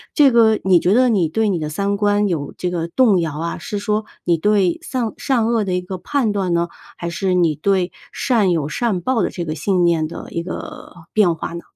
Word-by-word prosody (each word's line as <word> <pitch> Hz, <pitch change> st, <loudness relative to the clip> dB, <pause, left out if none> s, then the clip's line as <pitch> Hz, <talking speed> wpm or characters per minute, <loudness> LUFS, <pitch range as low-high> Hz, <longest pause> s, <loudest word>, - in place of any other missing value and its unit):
这 285 Hz, -4 st, +6 dB
个 225 Hz, -2 st, +4 dB
你 185 Hz, -2 st, +5 dB
觉 180 Hz, +4 st, +2 dB
得 250 Hz, 0 st, +4 dB
你 190 Hz, -7 st, +2 dB
对 220 Hz, +5 st, +1 dB
你 180 Hz, -4 st, 0 dB
的 150 Hz, -, -3 dB
三 200 Hz, +6 st, -1 dB
观 205 Hz, 0 st, +2 dB
有 155 Hz, -6 st, -3 dB
这 180 Hz, -, -2 dB
个 170 Hz, -1 st, -2 dB
动 210 Hz, -1 st, +3 dB
摇 155 Hz, -3 st, -3 dB
啊， 170 Hz, +1 st, -3 dB
是 205 Hz, -, -5 dB
说 210 Hz, +1 st, -1 dB, 0.2 s
你 170 Hz, -1 st, +2 dB
对 195 Hz, -1 st, +2 dB
善 240 Hz, -4 st, -2 dB
善 250 Hz, -5 st, +1 dB
恶 230 Hz, -2 st, +1 dB
的 190 Hz, -2 st, -2 dB
一 180 Hz, -, 0 dB
个 185 Hz, +1 st, -6 dB
判 265 Hz, -4 st, 0 dB
断 190 Hz, -4 st, -1 dB
呢， 170 Hz, 0 st, 0 dB, 0.3 s
还 170 Hz, -, -4 dB
是 185 Hz, +2 st, -1 dB
你 170 Hz, -3 st, +3 dB
对 185 Hz, +2 st, 0 dB, 0.2 s
善 225 Hz, -8 st, +1 dB
有 160 Hz, -4 st, 0 dB
善 205 Hz, +3 st, -1 dB
报 235 Hz, +3 st, 0 dB
的 -, -, 0 dB
这 175 Hz, -, -5 dB
个 155 Hz, -, -3 dB
信 180 Hz, +3 st, +1 dB
念 165 Hz, -2 st, +2 dB
的 160 Hz, -, -8 dB
一 170 Hz, -, -2 dB
个 175 Hz, -, -8 dB, 0.2 s
变 190 Hz, -6 st, +3 dB
化 165 Hz, -, -6 dB
呢？ 170 Hz, -, -6 dB
185 Hz, 250 characters per minute, -19 LUFS, 170-215 Hz, 0.3 s, 这